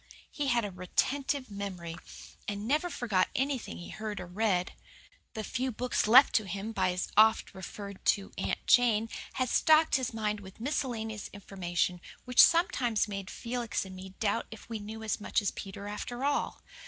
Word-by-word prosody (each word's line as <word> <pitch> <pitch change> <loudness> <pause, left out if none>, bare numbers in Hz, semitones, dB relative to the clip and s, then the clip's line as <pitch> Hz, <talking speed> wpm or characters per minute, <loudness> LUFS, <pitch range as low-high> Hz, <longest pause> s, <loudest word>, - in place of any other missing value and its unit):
He 290 -1 -2
had 240 -4 +2
a 205 - -4
retentive 260 +8 -1
memory, 185 -5 -5 0.5
and 205 +1 -3
never 300 +7 +1
forgot 215 - +1
anything 270 -1 -1
he 175 - -9
heard 215 -1 -5
or - - -5
read. 185 -1 0 0.6
The 220 - -3
few 260 +3 -2
books 245 -1 0
left 255 +6 +8
to 215 - -1
him 200 +4 -4
by 215 - +1
his 180 0 -2
oft 220 +1 +5
referred 200 +1 -8
to 200 -1 +2
Aunt - - -2
Jane 230 -2 +4 0.2
had 255 - 0
stocked 315 0 +5
his 260 -2 -2
mind 215 -2 -1
with 190 -1 -12
a - - -7
miscellaneous 230 -6 -2
information 180 -3 -2 0.2
which 250 -1 +6
sometimes 265 - +4
made 195 -2 -5
Felix 235 -4 -3
and 190 0 -9
me 190 0 -10
doubt 220 0 0
if 220 - -11
we 225 -2 -4
knew 220 +2 -7
as 215 -1 -2
much - - +1
as 205 -3 -1
Peter 200 +1 -7
after 240 +5 -4
all. 285 - -1
215 Hz, 180 wpm, -30 LUFS, 195-245 Hz, 0.6 s, left